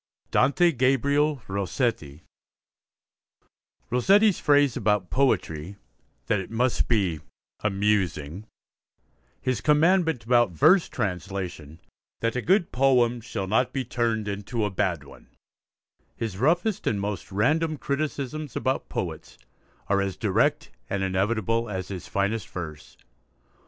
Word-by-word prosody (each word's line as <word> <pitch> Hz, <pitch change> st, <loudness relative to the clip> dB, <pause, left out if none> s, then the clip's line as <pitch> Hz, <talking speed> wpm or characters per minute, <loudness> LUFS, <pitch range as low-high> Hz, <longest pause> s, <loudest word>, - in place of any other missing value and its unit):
DANTE 170 Hz, +5 st, +4 dB
GABRIEL 140 Hz, +1 st, +1 dB
ROSSETTI 95 Hz, -, -2 dB, 1.7 s
Rossetti's 195 Hz, -, +4 dB
phrase 145 Hz, -3 st, +3 dB
about 105 Hz, -3 st, 0 dB
poetry, 95 Hz, -, 0 dB, 0.5 s
that 105 Hz, -, +1 dB
it 95 Hz, -, -6 dB
must 120 Hz, +2 st, 0 dB
be 95 Hz, -9 st, +1 dB, 0.4 s
'amusing'; 100 Hz, -4 st, -1 dB, 0.9 s
his 130 Hz, -5 st, -1 dB
'commandment' 160 Hz, -, +3 dB
about 120 Hz, -5 st, +3 dB
verse 165 Hz, -, +4 dB
translation, 90 Hz, -, -4 dB, 0.4 s
'that 115 Hz, +1 st, -1 dB
a 125 Hz, -, 0 dB
good 185 Hz, +3 st, +2 dB
poem 125 Hz, -2 st, +3 dB
shall 105 Hz, -4 st, -4 dB
not 115 Hz, +6 st, +1 dB
be 135 Hz, -1 st, -2 dB
turned 115 Hz, -3 st, -1 dB
into 105 Hz, +3 st, -2 dB
a 105 Hz, -, -2 dB
bad 90 Hz, -6 st, -1 dB
one'; 70 Hz, -1 st, -16 dB, 0.9 s
his 115 Hz, -4 st, -4 dB
roughest 175 Hz, -, +1 dB
and 105 Hz, -, +1 dB
most 100 Hz, -2 st, -4 dB
random 155 Hz, +10 st, +1 dB
criticisms 145 Hz, 0 st, -3 dB
about 130 Hz, 0 st, -1 dB
poets, -, -, -5 dB, 0.5 s
are 100 Hz, 0 st, +2 dB
as 95 Hz, -1 st, -3 dB
direct -, -, +1 dB, 0.2 s
and 95 Hz, -1 st, -1 dB
inevitable 110 Hz, +4 st, 0 dB
as 95 Hz, -2 st, -4 dB
his 95 Hz, -3 st, -6 dB
finest 100 Hz, +2 st, -1 dB
verse. 80 Hz, -4 st, -8 dB
115 Hz, 115 wpm, -25 LUFS, 95-135 Hz, 1.7 s, DANTE